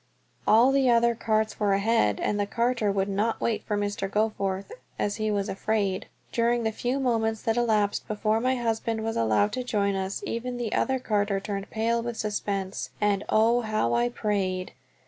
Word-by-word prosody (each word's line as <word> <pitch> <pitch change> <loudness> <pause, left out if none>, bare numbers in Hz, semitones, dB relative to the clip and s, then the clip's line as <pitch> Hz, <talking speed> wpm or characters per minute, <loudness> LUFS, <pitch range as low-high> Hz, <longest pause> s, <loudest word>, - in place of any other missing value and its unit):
All 235 +5 +6
the 270 -2 +3
other 235 0 +4
carts 220 -1 0
were 205 -2 +2
ahead, 195 - +2
and 205 - 0
the 205 - 0
carter 235 -1 +1
would 195 0 0
not 205 +3 0
wait 225 -2 -1
for 210 - -1
Mr. 205 -1 -2
Goforth, 200 -2 -1 0.3
as 205 +1 -1
he 215 -1 -1
was 200 -1 0
afraid. 200 -2 -1 0.2
During 235 0 +1
the 220 - +1
few 245 +5 -2
moments 225 -4 0
that 225 -2 +1
elapsed 215 -4 +1
before 215 +1 0
my 255 +1 +2
husband 225 -2 -1
was 225 0 -2
allowed 115 - +2
to 255 +3 -3
join 205 -4 0
us 190 0 -3
even 245 +2 -3
the 235 -3 -3 0.3
carter 205 -2 +1
turned 200 0 -5
pale 230 +1 0
with 235 -1 -4
suspense, 200 -2 -3
and 205 -1 +1
oh, 230 +3 +4
how 215 - 0
I 120 +1 +2
prayed! 185 - -2
215 Hz, 180 wpm, -27 LUFS, 200-230 Hz, 0.3 s, All